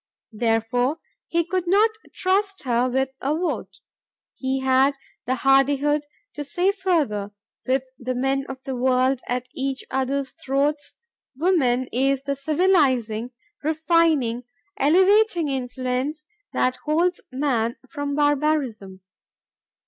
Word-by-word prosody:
Therefore 235 +5 +1 0.3
he 335 0 +1
could 360 +1 -2
not 415 +5 +4 0.2
trust 390 +1 0
her 245 -1 +1
with 265 +1 0
a 285 +3 0
vote. 355 +1 -3 0.5
He 265 0 -2
had 265 +2 +3 0.3
the 255 - +1
hardihood 280 +3 +2 0.3
to 295 - -5
say 355 +7 +1
further, 305 - -1 0.3
with 260 0 +2 0.2
the 255 +1 -3
men 270 +2 0
of 265 0 -8
the 265 - -4
world 255 +1 +2
at 250 0 -2
each 270 -1 -3
other's 265 +1 -1
throats,... 290 -1 -1 0.4
"Woman 265 -7 +2
is 270 +2 +1
the 280 0 -2
civilizing, 275 - +2 0.3
refining, 310 -6 +2 0.3
elevating 370 +2 +4
influence 260 +3 -3 0.3
that 255 0 +1
holds 335 +6 0
man 255 -4 0
from 285 +2 -4
barbarism." 285 -10 0
275 Hz, 115 wpm, -23 LUFS, 255-310 Hz, 0.5 s, not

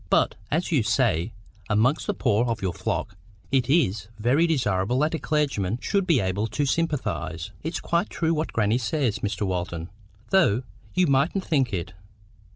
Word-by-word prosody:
But, - - +3 0.2
as 165 +5 0
you 145 -6 +3
say, 110 - +1 0.4
amongst 115 +8 +2
the - - 0
poor 105 +4 +2
of 115 -2 -1
your 95 -4 -2
flock,—it 115 +9 -3
IS 110 - +2
very 130 +10 +3
desirable 115 - +1
that 150 +4 +1
a 160 - -1
clergyman 130 -10 0
should 195 +3 0
be 160 -7 +4
able 95 +3 0
to 145 +7 -1
sympathise." 110 - -2
"It's 160 +3 -3
quite 170 +4 0
true 165 0 0
what 155 0 -2
grannie 110 +2 +1
says, 130 -3 0
Mr. 105 +1 -2
Walton, 90 -2 -3 0.4
though 135 - +4 0.3
you 180 0 +4
mightn't 145 +7 +1
think 135 -7 +1
it. 90 -2 -3
120 Hz, 165 wpm, -25 LUFS, 100-155 Hz, 0.4 s, be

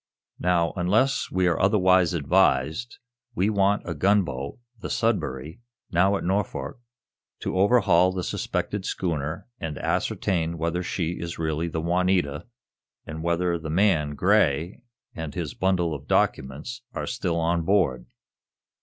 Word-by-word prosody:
Now, 85 -2 +1
unless 105 +9 +1
we 95 0 +1
are 85 -2 +2
otherwise 95 -3 +4
advised, 80 - +1 0.4
we 105 +1 +2
want 100 -1 +1
a 85 - -2
gunboat, 85 -5 0 0.2
the - - -6
'Sudbury,' 80 - -1 0.3
now 95 +4 +3
at - - -6
Norfolk, 100 +7 -2 0.6
to - - -3
overhaul 95 -3 +4
the 95 -1 -3
suspected - - -2
schooner 80 -2 -3
and 80 -3 -4
ascertain 85 -3 -1
whether 85 +2 -1
she 90 -1 -3
is 85 0 -5
really 80 +1 -1
the 80 -1 -3
'Juanita,' 90 -3 0 0.6
and 80 0 -6
whether 85 +1 0
the 80 -1 -6
man, 80 -4 +2
Gray, 90 -3 +2 0.3
and 80 -3 -6
his - - -3
bundle 90 -3 +1
of 70 -1 -8
documents 75 - -1
are - - -3
still 90 -8 -2
on 85 +1 +1
board. 80 -9 +1
85 Hz, 135 wpm, -25 LUFS, 80-95 Hz, 0.6 s, otherwise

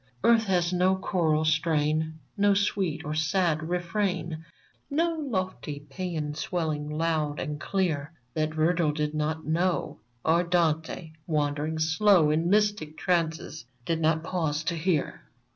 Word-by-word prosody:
Earth 230 -1 +5
has 180 -2 +1
no 185 +1 +3
choral 160 -5 +1
strain, 155 -1 +1 0.2
No 205 -1 +3
sweet 190 -5 0
or 150 - -2
sad 160 0 +1
refrain, 175 -2 -1 0.5
No 330 +4 +1
lofty 185 - -3
paean 160 -3 -3
swelling 155 -2 -2
loud 155 -1 -1
and 150 0 -4
clear, 165 -7 -1 0.2
That 155 0 0
Virgil 160 -1 +2
did 150 0 -1
not 155 +1 -2
know, 175 +3 0 0.3
Or 165 +2 +4
Dante, 165 -1 0 0.2
wandering 150 0 0
slow 160 +1 +4
In 165 +3 +1
mystic 205 -6 +1
trances, 160 -5 -1 0.2
did 165 +1 -1
not 160 0 +2
pause 160 -3 -1
to 170 +1 -1
hear 165 -2 -1
160 Hz, 130 wpm, -27 LUFS, 155-180 Hz, 0.5 s, Earth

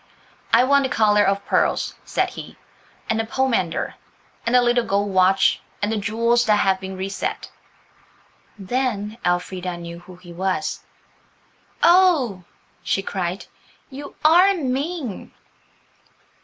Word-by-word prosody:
"I - - +6
want 280 +2 +4
the 265 - -1
collar 210 -3 +3
of 200 0 0
pearls," - - +1
said - - -1
he, - - -10 0.5
"and 220 - 0
the - - +1
pomander, 225 -8 -1 0.5
and 235 - +2
the 250 - +6
little 240 0 +2
gold 200 -1 -1
watch, 190 +1 +3 0.2
and 205 +1 -1
the 225 - -1
jewels 230 +3 +1
that 210 - +5
have 195 -2 +2
been 190 0 -7
reset." 190 +1 -4 1.1
Then 215 0 -2
Elfrida 180 0 -2
knew 170 0 -8
who 180 +1 -14
he 175 -1 -13
was. 190 +2 -2 1.0
"Oh," 335 - +4 0.4
she 195 - -1
cried, 185 -1 -4 0.5
"you 280 +2 -9
are 360 +5 +6
mean!" 275 - -4
210 Hz, 130 wpm, -22 LUFS, 190-255 Hz, 1.1 s, I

